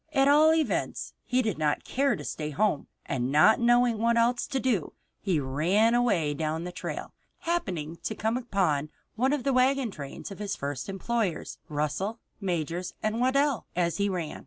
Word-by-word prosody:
At 270 -1 +4
all 300 +2 +6
events, 320 -1 -1
he 255 0 +1
did 215 -8 -2
not 150 -1 +1
care 275 +1 +1
to - - -8
stay 150 - -4
at - - -8
home, 205 -5 +1 0.2
and 130 -2 -1
not 155 +10 +6
knowing 240 -1 +3
what 235 +1 +2
else 240 +1 +2
to 270 - -1
do, 235 - 0 0.3
he 185 -6 0
ran 170 - +2
away 205 -12 +2
down 155 +2 -2
the 180 - -5
trail, - - -6 0.3
happening 180 - -2
to 220 - -2
come 220 +2 0
upon 185 - 0 0.3
one 255 +4 +2
of 290 -4 0
the 275 - +1
wagon 255 -1 +2
trains 140 +3 -8
of 195 - -9
his 205 -1 -3
first 140 +3 -4
employers, 195 -2 -2
Russell, 150 +8 -2 0.2
Majors 175 -2 -2
& - - -32
Waddell, 255 +3 +1
as 170 -1 0
he 200 0 +1
ran. 175 -5 -3
205 Hz, 185 wpm, -28 LUFS, 160-245 Hz, 0.3 s, all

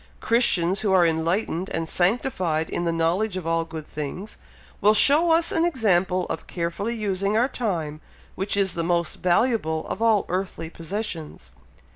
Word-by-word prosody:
Christians 195 -6 +2
who 205 - 0
are 180 -2 +5
enlightened 170 +3 -1
and 165 0 -3
sanctified 175 -5 0
in 175 - -2
the 170 - +1
knowledge 175 +5 0
of 180 - -6
all 165 0 0
good 160 -2 -8
things, 155 +9 -7 0.4
will 210 +2 +5
show 300 +9 +6
us 330 +1 +3
an 325 - +1
example 190 - +1
of - - -6
carefully 175 +7 -3
using 200 -1 -1
our 240 +3 +3
time, 165 - -3 0.3
which 200 +2 -1
is 195 -3 +1
the 170 - -2
most 170 0 0
valuable 175 -4 +1
of - - -5
all 225 -3 +3
earthly 180 -3 -4
possessions. 165 - -6
185 Hz, 160 wpm, -24 LUFS, 165-215 Hz, 0.4 s, show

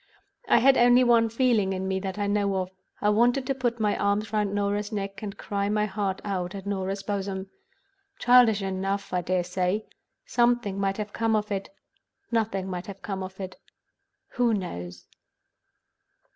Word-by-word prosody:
I - - +5
had 270 +2 +5
only 245 +1 +6
one 235 -2 +4
feeling 225 -5 +2
in 190 0 -3
me 190 0 0
that 190 0 -5
I 205 - 0
know 200 -1 +1
of. 185 -1 -2 0.3
I 210 - +3
wanted 240 +5 +3
to 275 - 0
put 240 -3 -1
my 210 -1 +2
arms 205 +2 0
round 210 -2 +1
Norah's 205 +1 -1
neck, 195 -2 -4
and 200 -2 -6
cry 200 0 -2
my 210 0 +1
heart 195 -1 -2
out 185 -2 -2
on 195 - -6
Norah's 195 0 -2
bosom. 195 -1 -3 0.7
Childish 245 -4 +5
enough, 195 +1 -2
I 180 - +1
dare 180 +1 0
say. 180 +4 -1 0.4
Something 240 - +1
might 195 0 0
have 210 -1 -5
come 225 -1 +1
of 210 0 -1
it; 195 -1 -2 0.6
nothing 215 -5 0
might 180 -1 -5
have 195 -1 -9
come 195 -2 -4
of 190 +1 -7
it—who 225 +4 -4
knows? 90 - -6
200 Hz, 170 wpm, -26 LUFS, 190-220 Hz, 0.7 s, only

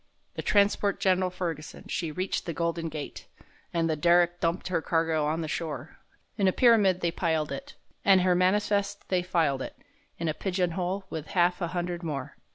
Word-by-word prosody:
The - - -4
transport 200 -1 +2
Gen'ral 185 -1 +2
Ferguson, 165 -4 -5
she 165 -3 -2
reached 185 +4 -2
the 170 - -2
Golden 170 0 -1
Gate, 150 -2 -7 0.4
An' 165 -1 +1
the 160 -1 +1
derrick 175 +2 +3
dumped 170 +2 -1
her 170 -3 0
cargo 160 -2 +1
on 160 +2 -1
the 160 - -3
shore; 155 0 -5 0.4
In 195 - +4
a - - +5
pyramid 205 -6 +4
they 170 - +1
piled 160 -4 0
it—and 185 +7 0
her 180 0 +3
manifest 200 +2 +1
they 185 -1 +2
filed 165 -7 +1
it, - - -6 0.4
In 165 - -2
a 155 - +1
pigeon 180 +1 -1
hole 185 +3 -2
with 160 -1 -5
half 175 +1 +3
a 170 - 0
hundred 175 0 -3
more. 145 -6 -4
175 Hz, 180 wpm, -28 LUFS, 160-185 Hz, 0.4 s, a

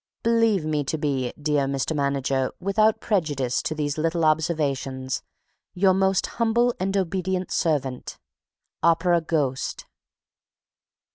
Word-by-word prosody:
Believe 230 -6 +2
me 150 -1 0
to 160 - -2
be, 135 -5 -1
dear 145 -2 +1
Mr. 140 +3 -1
Manager, 135 -2 0
without 215 +3 +2
prejudice 145 - 0
to 155 - -3
these 150 0 -2
little 165 +1 +1
observations, 140 -5 0 0.5
Your 190 +1 +4
Most 190 0 +2 0.2
Humble 235 +2 +3
and 195 +2 0
Obedient 185 0 -1
Servant, 135 -6 -1 0.6
OPERA 170 +1 +3
GHOST. 145 -5 -2
160 Hz, 115 wpm, -24 LUFS, 140-190 Hz, 0.6 s, Your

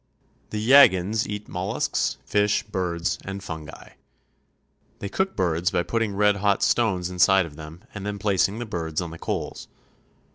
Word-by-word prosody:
The 110 - -4
Yaghans 110 -4 +5
eat 105 0 -5
mollusks, 95 +2 -1
fish, 105 0 +1
birds, 90 -4 -2
and 95 0 -6
fungi. 80 -4 -8 1.1
They 100 - -5
cook 190 - -1
birds 90 -2 +1
by 90 -3 0
putting 115 0 -1
red 105 0 +3
hot 100 0 +1
stones 95 -7 +1
inside 95 +1 +4
of 75 -3 -11
them 80 +3 -11
and 100 - -7
then 100 0 -3
placing 100 0 +1
the 120 - -4
birds 80 -6 -3
on 85 -2 -4
the 85 - -10
coals. - - -4
95 Hz, 155 wpm, -24 LUFS, 90-105 Hz, 1.1 s, Yaghans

